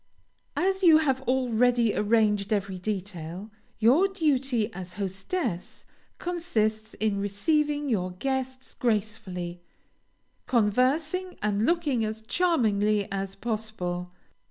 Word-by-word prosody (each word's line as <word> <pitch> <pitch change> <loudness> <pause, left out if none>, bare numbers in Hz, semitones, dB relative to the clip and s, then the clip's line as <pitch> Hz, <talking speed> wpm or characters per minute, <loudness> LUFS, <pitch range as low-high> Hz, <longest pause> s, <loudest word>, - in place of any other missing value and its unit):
As 380 +1 +1
you 330 -4 +8
have 270 -4 +1
already 245 -2 +3
arranged 210 -2 +2
every 195 -3 -1
detail, 185 -1 -5 0.3
your 260 - +5
duty 270 - 0
as 180 -2 -8
hostess 195 - -4 0.3
consists 220 -12 -1
in 210 -2 0
receiving 295 +9 0
your 190 -8 0
guests 260 +4 -3
gracefully, 205 -6 -2 0.9
conversing 270 - +1
and 210 +2 +1
looking 305 -9 +1
as 220 0 -4
charmingly 215 - +2
as 195 0 -3
possible. 210 -6 -3
220 Hz, 100 wpm, -27 LUFS, 200-270 Hz, 0.9 s, you